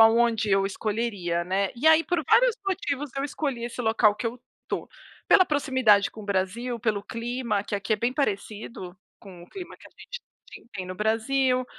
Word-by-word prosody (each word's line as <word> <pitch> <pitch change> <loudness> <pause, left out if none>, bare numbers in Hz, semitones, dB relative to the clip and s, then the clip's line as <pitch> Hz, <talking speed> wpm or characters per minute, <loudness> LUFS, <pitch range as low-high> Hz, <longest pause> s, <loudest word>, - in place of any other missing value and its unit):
a 225 - +10
onde 230 -2 +2
eu 195 0 +3
escolheria, 200 -4 -2
né. 190 +2 0
E 250 +6 -2
aí, 320 0 +7
por 335 0 -1
vários - - +4
motivos, 295 -7 -2
eu 275 - -1
escolhi 275 -4 -3
esse 240 +1 -5
local 220 -2 +3
que 220 - -4
eu 235 +2 -5 0.2
estou. - - -4 0.4
Pela 370 - +7
proximidade 260 - +3
com 220 - -11
o - - -10
Brasil, 205 +5 -2
pelo 210 -2 -1
clima, 230 -1 -2
que - - -4
aqui 205 +2 -1
é - - +3
bem 235 +4 0
parecido 205 - -4 0.2
com 180 -3 -12
o - - -15
clima 365 -3 -8
que - - -16
a - - -31
gente 485 - -10 0.3
ti - - -12
tem 185 -2 -5
no 185 - -6
Brasil. 250 +5 +1
230 Hz, 200 wpm, -26 LUFS, 200-260 Hz, 0.4 s, a